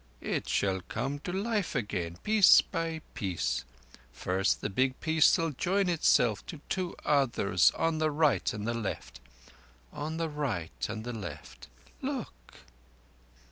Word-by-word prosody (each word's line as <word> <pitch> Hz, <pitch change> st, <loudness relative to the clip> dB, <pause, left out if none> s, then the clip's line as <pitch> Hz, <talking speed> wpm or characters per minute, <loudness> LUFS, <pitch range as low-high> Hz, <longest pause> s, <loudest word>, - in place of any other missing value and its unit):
It -, -, -2 dB
shall 95 Hz, -2 st, +1 dB
come 135 Hz, +6 st, -2 dB
to 175 Hz, -, -5 dB
life 205 Hz, -1 st, -1 dB
again, 90 Hz, -8 st, -2 dB
piece 215 Hz, -3 st, +7 dB
by 165 Hz, -2 st, -3 dB
piece. 95 Hz, -, -2 dB, 0.5 s
First 95 Hz, +2 st, 0 dB
the -, -, -2 dB
big 130 Hz, +5 st, +1 dB
piece 160 Hz, -1 st, +4 dB
shall 165 Hz, -1 st, 0 dB
join 185 Hz, +7 st, 0 dB
itself 125 Hz, -, +3 dB
to 160 Hz, -, -7 dB
two 185 Hz, -2 st, -2 dB
others 120 Hz, -, +3 dB
on 165 Hz, -1 st, 0 dB
the 155 Hz, 0 st, +2 dB
right 145 Hz, -, +2 dB
and 105 Hz, +1 st, -5 dB
the 120 Hz, -, 0 dB
left—on 60 Hz, -, -8 dB
the 165 Hz, 0 st, -1 dB
right 95 Hz, -, -3 dB
and 110 Hz, 0 st, -5 dB
the 120 Hz, +1 st, -5 dB
left. 85 Hz, -10 st, -8 dB, 0.3 s
Look!" -, -, -6 dB
125 Hz, 140 wpm, -30 LUFS, -, 0.5 s, piece